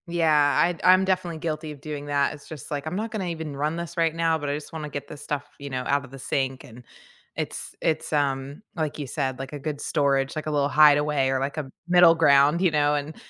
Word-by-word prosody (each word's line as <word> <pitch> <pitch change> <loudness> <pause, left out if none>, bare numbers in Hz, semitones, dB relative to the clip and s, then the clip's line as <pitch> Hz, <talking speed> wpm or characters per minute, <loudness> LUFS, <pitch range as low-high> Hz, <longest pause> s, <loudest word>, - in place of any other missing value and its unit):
Yeah. 155 -4 +3
I'd 170 0 -1
I'm 185 +1 +6
definitely 185 -3 -1
guilty 155 -1 -4
of 145 - -10
doing 145 -2 -6
that. 145 0 +1
It's 145 -1 -13
just 155 -3 -9
like, 145 0 -3
I'm 160 - -3
not 220 +3 -3
gonna 210 -4 -3
even 160 -4 -5
run 150 +3 -1
this 170 +1 -6
right 165 -1 +1
now, 165 -1 +1
but 145 -2 -4
I 145 - 0
just 150 +1 -8
wanna 155 -2 -5
get 145 -1 -6
this 150 - -10
stuff, 145 -1 -3
you 140 0 -7
know, 130 -1 -3
out 140 0 +1
of 130 - -16
the 135 - -9
sink. 130 0 -2
And 120 +1 -13 0.5
it's - - -5
it's, 160 -1 -1
um 140 0 -1
like 155 -3 -2
you 145 - -3
said, 130 -1 -2
like 135 +1 -7
a 145 - -5
good 145 +1 -4
storage, 140 -3 0
like 155 0 -4
a - - -1
little 145 -1 +1
hideaway 145 -2 +4
or 135 0 +1
like 140 +3 -3
a 145 -3 -4 0.2
middle 175 -1 +7
ground, 145 +1 +4
you 185 -3 +3
know? 150 -1 +2
And, 145 +2 -4
150 Hz, 250 wpm, -25 LUFS, 140-165 Hz, 0.5 s, middle